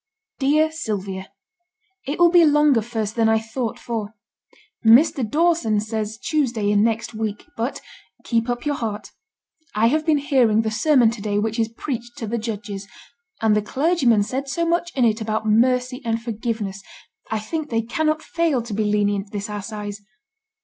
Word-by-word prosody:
'DEAR 305 Hz, +3 st, +3 dB
SYLVIA, 195 Hz, -, -4 dB, 0.8 s
'It 285 Hz, -, -2 dB
will 345 Hz, -1 st, +5 dB
be 350 Hz, -1 st, +7 dB
longer 295 Hz, -5 st, +4 dB
first 220 Hz, -2 st, -3 dB
than 225 Hz, -2 st, +3 dB
I 220 Hz, -, +4 dB
thought 225 Hz, +1 st, -4 dB
for. 225 Hz, -2 st, -5 dB, 0.7 s
Mr. 250 Hz, +4 st, +5 dB
Dawson 295 Hz, -4 st, +2 dB
says 220 Hz, 0 st, -3 dB
Tuesday 235 Hz, -8 st, 0 dB
in 205 Hz, 0 st, +4 dB
next 230 Hz, +1 st, -1 dB
week. 215 Hz, -1 st, -4 dB
But 235 Hz, +4 st, -3 dB, 0.4 s
keep 230 Hz, 0 st, 0 dB
up 245 Hz, +3 st, -2 dB
your 295 Hz, -, +1 dB
heart. 210 Hz, -6 st, -4 dB, 0.6 s
I 225 Hz, +2 st, +4 dB
have 310 Hz, +4 st, +1 dB
been 310 Hz, -1 st, +3 dB
hearing 250 Hz, -6 st, +3 dB
the 220 Hz, -, -1 dB
sermon 245 Hz, 0 st, +4 dB
to 230 Hz, -3 st, -7 dB
day 205 Hz, -1 st, -1 dB
which 220 Hz, +2 st, -1 dB
is 225 Hz, 0 st, +1 dB
preached 240 Hz, 0 st, -6 dB
to 225 Hz, -, -4 dB
the 230 Hz, +2 st, -2 dB
judges; 205 Hz, -3 st, -5 dB, 0.6 s
and 215 Hz, -1 st, +4 dB
the 210 Hz, -, +2 dB
clergyman 260 Hz, -, +2 dB
said 265 Hz, +6 st, -4 dB
so 335 Hz, +4 st, 0 dB
much 345 Hz, +1 st, 0 dB
in 255 Hz, -3 st, +3 dB
it 220 Hz, 0 st, +1 dB
about 220 Hz, 0 st, -2 dB
mercy 250 Hz, +4 st, +2 dB
and 230 Hz, -1 st, -1 dB
forgiveness, 225 Hz, -4 st, -4 dB, 0.5 s
I 220 Hz, -, -1 dB
think 300 Hz, +9 st, -4 dB
they 225 Hz, -1 st, 0 dB
cannot 310 Hz, +6 st, -1 dB
fail 325 Hz, -8 st, 0 dB
to 230 Hz, -2 st, -6 dB
be 215 Hz, +1 st, 0 dB
lenient 205 Hz, -1 st, 0 dB
this 205 Hz, -1 st, -4 dB
assize. 205 Hz, 0 st, -6 dB
225 Hz, 170 wpm, -22 LUFS, 215-275 Hz, 0.8 s, be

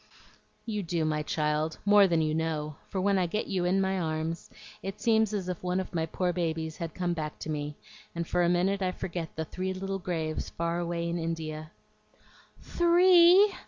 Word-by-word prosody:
"You 215 Hz, -3 st, -2 dB
do, 170 Hz, -3 st, -1 dB
my 155 Hz, -1 st, 0 dB
child, 150 Hz, +1 st, -1 dB
more 205 Hz, -1 st, +7 dB
than 165 Hz, -3 st, +2 dB
you 155 Hz, 0 st, 0 dB
know; 155 Hz, -2 st, -2 dB
for 195 Hz, -, -2 dB
when 195 Hz, +1 st, +2 dB
I 180 Hz, -, +1 dB
get 210 Hz, +6 st, -2 dB
you 185 Hz, -3 st, -1 dB
in 185 Hz, +2 st, +2 dB
my 190 Hz, 0 st, +1 dB
arms 160 Hz, 0 st, -3 dB, 0.3 s
it 195 Hz, +1 st, -6 dB
seems 220 Hz, -2 st, +3 dB
as 200 Hz, -4 st, -3 dB
if 180 Hz, -2 st, -4 dB
one 180 Hz, +1 st, 0 dB
of 190 Hz, -, -5 dB
my 165 Hz, -1 st, 0 dB
poor 180 Hz, +2 st, -1 dB
babies 160 Hz, -2 st, -2 dB
had 165 Hz, -3 st, -5 dB
come 175 Hz, -1 st, -1 dB
back 155 Hz, -2 st, -4 dB
to 155 Hz, -, -5 dB
me, 150 Hz, -1 st, -3 dB, 0.4 s
and 170 Hz, -1 st, -3 dB
for 180 Hz, -, +1 dB
a 170 Hz, -, +3 dB
minute 190 Hz, +3 st, +1 dB
I 185 Hz, -1 st, 0 dB
forget 170 Hz, -3 st, -5 dB
the 160 Hz, -, -3 dB
three 185 Hz, +3 st, -4 dB
little 195 Hz, +1 st, -3 dB
graves 165 Hz, -4 st, -3 dB
far 170 Hz, +1 st, -2 dB
away 170 Hz, -1 st, -2 dB
in 170 Hz, +1 st, -2 dB
India." 155 Hz, -2 st, -4 dB, 0.9 s
"Three!" 355 Hz, +3 st, +6 dB
175 Hz, 195 wpm, -29 LUFS, 160-195 Hz, 0.9 s, more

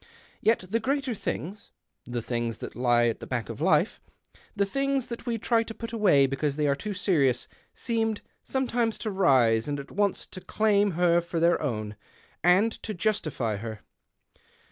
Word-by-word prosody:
Yet 225 Hz, -4 st, +2 dB
the 225 Hz, +5 st, 0 dB
greater 275 Hz, +2 st, -1 dB
things 200 Hz, -1 st, -5 dB, 0.2 s
— -, -, -54 dB
the 120 Hz, -2 st, -3 dB
things 120 Hz, -2 st, -2 dB
that -, -, -8 dB
lie 120 Hz, 0 st, +3 dB
at 115 Hz, -, 0 dB
the -, -, -8 dB
back 120 Hz, -5 st, -3 dB
of -, -, -7 dB
life -, -, +2 dB, 0.3 s
— -, -, -28 dB
the 200 Hz, -, +2 dB
things 275 Hz, +4 st, 0 dB
that 235 Hz, -, -9 dB
we 235 Hz, -1 st, 0 dB
try 230 Hz, +1 st, +2 dB
to 225 Hz, 0 st, -6 dB
put 230 Hz, 0 st, -7 dB
away 185 Hz, -11 st, +5 dB
because 135 Hz, +1 st, -1 dB
they 150 Hz, 0 st, 0 dB
are 140 Hz, -, +3 dB
too 200 Hz, +9 st, -5 dB
serious 145 Hz, -, +1 dB
— -, -, -37 dB
seemed 225 Hz, -2 st, -1 dB, 0.2 s
sometimes 240 Hz, -4 st, 0 dB
to 215 Hz, -, -3 dB
rise 130 Hz, -, +3 dB
and 145 Hz, -1 st, -2 dB
at 140 Hz, -, -9 dB
once 200 Hz, -1 st, 0 dB
to 185 Hz, -, -8 dB
claim 205 Hz, 0 st, +2 dB
her 175 Hz, 0 st, +3 dB
for 170 Hz, 0 st, -3 dB
their 170 Hz, +1 st, +3 dB
own, 110 Hz, -7 st, -3 dB, 0.5 s
and 185 Hz, +6 st, +5 dB
to 215 Hz, -, -5 dB
justify 155 Hz, -, -1 dB
her. 110 Hz, 0 st, -7 dB
180 Hz, 190 wpm, -27 LUFS, 130-220 Hz, 0.5 s, away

